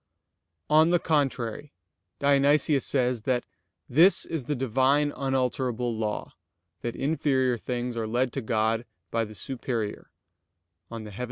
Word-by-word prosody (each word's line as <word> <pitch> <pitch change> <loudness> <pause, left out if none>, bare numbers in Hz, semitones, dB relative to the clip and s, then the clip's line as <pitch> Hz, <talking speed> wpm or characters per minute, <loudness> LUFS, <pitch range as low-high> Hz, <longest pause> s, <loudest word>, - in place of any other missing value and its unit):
On 155 +2 +5
the 175 - +4
contrary, 145 -4 -1 0.4
Dionysius 140 0 +3
says 125 -3 +1
that 125 -1 +1 0.4
"this 170 +9 +5
is 160 -6 -4
the 150 - -1
Divine 135 +4 +2
unalterable 125 -3 -1
law, 110 -1 -3 0.5
that 120 - -4
inferior 135 -3 +1
things 120 +1 -4
are 115 -1 -2
led 120 +2 0
to 135 - -2
God 110 +1 0 0.3
by 115 0 0
the 110 0 -11
superior" 120 -3 -3 0.8
(Coel. 110 -2 -7
130 Hz, 120 wpm, -27 LUFS, 115-140 Hz, 0.8 s, On